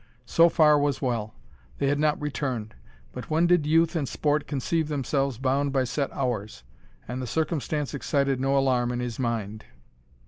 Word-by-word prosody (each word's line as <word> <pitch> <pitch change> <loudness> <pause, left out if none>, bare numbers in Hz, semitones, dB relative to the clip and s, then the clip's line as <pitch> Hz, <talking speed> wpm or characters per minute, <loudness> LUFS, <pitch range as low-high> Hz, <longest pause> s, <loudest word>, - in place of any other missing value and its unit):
So 165 +7 +5
far 150 -3 +5
was 145 -1 0
well. 115 -5 -2 0.4
They - - -1
had 145 +1 +1
not 150 0 +2
returned; 130 -7 -3 0.4
but - - -8
when 160 +2 +2
did 175 -4 +3
youth 165 +2 +3
and 145 -5 -1
sport 150 0 0
conceive 155 +3 -1
themselves 140 -3 -1
bound 135 +2 0
by 135 -1 +1
set 135 +3 -2
hours? 110 - -3 0.4
and 125 +2 -4
the 125 - -4
circumstance 155 -1 -2
excited 140 -2 0
no 135 +1 +1
alarm 125 -3 +2
in 120 - -3
his 120 -1 -4
mind. 110 -4 -3
140 Hz, 170 wpm, -26 LUFS, 125-150 Hz, 0.4 s, So